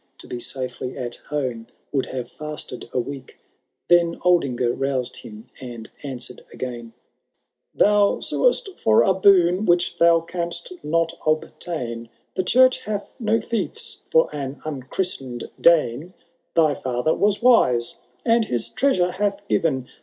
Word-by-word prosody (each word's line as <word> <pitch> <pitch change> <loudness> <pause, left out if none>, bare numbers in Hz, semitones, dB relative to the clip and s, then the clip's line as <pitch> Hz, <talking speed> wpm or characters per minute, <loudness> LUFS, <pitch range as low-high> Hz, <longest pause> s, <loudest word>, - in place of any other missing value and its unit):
To - - -10
be 125 - -5
safely 130 0 -4
at 120 -1 -3
home 130 -6 -3 0.2
would 135 -2 0
haye 130 -1 -4
&8ted 150 0 -7
a - - 0
week 135 +1 -6 0.3
:— - - -55
Then 170 -1 +4
Aldingar 140 -9 +2
roused 135 -2 -2
him, 110 +3 -11
and 120 -3 -9
answered 125 -3 -7
again, 120 -2 -6 0.8
Thou 205 -1 +4
suest 485 -5 +1
for 110 +1 +5
a 190 - +4
boon 185 0 +4
which 175 0 +2
thou 170 0 +6
canst 170 0 -5
not 165 +2 +1
obtain; 155 -7 -3 0.2
The - - 0
church 255 +6 +5
hath 210 -4 -5
no 225 -1 +2
fiefii 235 - -3
for 485 0 +3
an 140 -1 -5
unchristen'd 135 -3 -4
Dane. 165 0 +3 0.4
Thy 155 -3 +4
fiither 130 +3 -1
was 205 +2 +1
wise, 125 - +4 0.3
and 230 -1 +4
his 120 - -1
treasure 185 -11 +2
hath 200 +1 -2
given. 135 -10 0
155 Hz, 140 wpm, -23 LUFS, 125-185 Hz, 0.8 s, thou